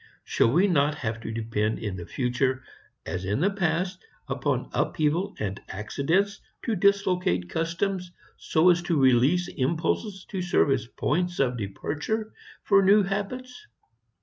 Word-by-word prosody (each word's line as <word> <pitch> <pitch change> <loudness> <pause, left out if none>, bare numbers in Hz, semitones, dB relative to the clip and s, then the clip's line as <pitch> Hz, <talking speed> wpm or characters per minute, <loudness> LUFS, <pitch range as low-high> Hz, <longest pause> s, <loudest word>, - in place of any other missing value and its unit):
Shall 115 - +2
we 180 +9 +4
not 150 -4 +2
have 115 -5 -3
to 110 - -5
depend 110 -1 -1
in 105 -4 -4
the 85 -2 -7
future 130 +1 0 0.4
as 95 0 -4
in 100 +5 -1
the 195 +6 +2
past 180 - -1 0.2
upon - - -1
upheaval 165 +7 0
and 100 -2 -4
accident 160 - 0 0.2
to 225 - 0
dislocate 180 - +1
customs 175 +2 -2 0.2
so 165 +3 +3
as 175 0 +2
to 170 -3 0
release 135 +7 +4
impulses 170 - -1
to 190 -3 -3
serve 175 -5 +2
as 130 -3 0
points 175 +7 -1
of 125 -2 +1
departure 150 - -3 0.3
for 200 -1 +5
new 200 +2 +6
habits? 250 - -4
165 Hz, 145 wpm, -26 LUFS, 125-195 Hz, 0.4 s, new